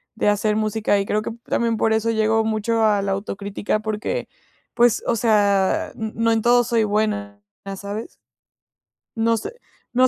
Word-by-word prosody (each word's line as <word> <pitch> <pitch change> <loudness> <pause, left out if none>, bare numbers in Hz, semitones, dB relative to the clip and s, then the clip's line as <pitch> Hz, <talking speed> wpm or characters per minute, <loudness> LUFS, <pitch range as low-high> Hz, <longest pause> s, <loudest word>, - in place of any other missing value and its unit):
de 215 - +2
hacer 210 +1 +1
música, 215 -1 +1
y 195 - -1
creo 210 +1 0
que 215 - -5
también 230 -1 0
por 220 +1 +2
eso 220 +1 +1
llego 220 0 +2
mucho 220 +1 0
a 205 -2 +3
la 195 - -1
autocrítica, 200 +1 -3
porque, 215 - -3 0.5
pues, 240 -1 +3
o 235 - +2
sea, 205 -4 +2
n 220 -1 -5
no 230 0 +2
en 225 -1 +2
todo 240 +2 +4
soy 230 -1 +1
buena, 205 -1 -1 0.4
¿sabes? 205 +3 -6 1.1
No 230 0 +2
sé - - -5 0.4
no 255 +1 +6
215 Hz, 165 wpm, -22 LUFS, 205-225 Hz, 1.1 s, no